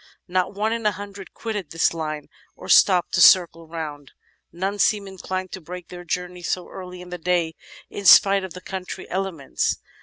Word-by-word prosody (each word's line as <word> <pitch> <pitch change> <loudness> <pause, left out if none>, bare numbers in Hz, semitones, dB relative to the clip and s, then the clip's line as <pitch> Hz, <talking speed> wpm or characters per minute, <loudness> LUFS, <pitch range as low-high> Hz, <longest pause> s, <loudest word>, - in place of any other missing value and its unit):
Not 185 +2 0
one 215 +2 0
in 230 0 -3
a 210 - +2
hundred 200 0 -9
quitted 210 -8 -4
this 165 +2 +1
line 155 -2 -4 0.3
or - - -11
stopped 180 -3 +5
to - - +3
circle 165 -3 +6
round; 150 -4 -7 0.4
none 195 +4 -3
seemed 205 0 +2
inclined 185 -1 -5
to 190 - -7
break 180 +2 -9
their 175 0 -9
journey 180 +1 -4
so 180 +1 -2
early 180 -1 -9
in 180 - -12
the 180 0 -6
day, 170 -1 0 0.3
in 200 - -8
spite 195 +1 +7
of 190 -2 -7
the 180 - -8
contrary 190 -1 -6
elements. 185 -7 -1
180 Hz, 185 wpm, -23 LUFS, 170-195 Hz, 0.4 s, spite